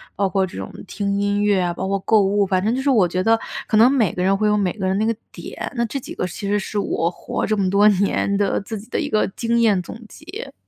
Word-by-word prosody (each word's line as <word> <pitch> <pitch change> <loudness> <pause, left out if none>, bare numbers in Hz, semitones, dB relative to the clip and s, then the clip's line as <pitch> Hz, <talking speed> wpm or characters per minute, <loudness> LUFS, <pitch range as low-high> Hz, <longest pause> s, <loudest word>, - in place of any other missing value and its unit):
包 195 0 0
括 190 0 +1
这 175 - -10
种 95 - -6 0.2
听 200 -1 -2
音 205 0 0
乐 205 -2 +3
啊， 175 -1 -1
包 190 +2 -4
括 195 0 0
购 215 +2 +3
物， 200 +1 +2
反 185 -1 0
正 220 +4 +1
就 265 - -2
是 285 - +2
我 210 -8 +4
觉 185 +2 -2
得 225 +1 +3 0.3
可 - - 0
能 235 +4 +6
每 240 -9 +2
个 180 - -3
人 195 +1 +3
会 215 0 +1
有 210 - +3
每 190 -3 +1
个 190 -3 -4
人 190 - +1
那 220 - +1
个 230 - 0 0.2
点。 - - -7
那 235 - 0
这 275 +5 -4
几 - - -9
个 180 - -2
其 200 +3 -6
实 205 +1 +1
是 205 - -5
我 170 -4 0
活 - - -4
这 215 0 0
么 195 - +1
多 200 +2 +5
年 200 0 +1
的 200 0 0
自 220 +2 -6
己 215 - -13
的 - - -1
一 295 -3 -2
个 215 - +1
经 235 0 0
验 210 -5 +3
总 215 +6 -9
结。 370 - -9
205 Hz, 310 characters per minute, -21 LUFS, 190-225 Hz, 0.3 s, 能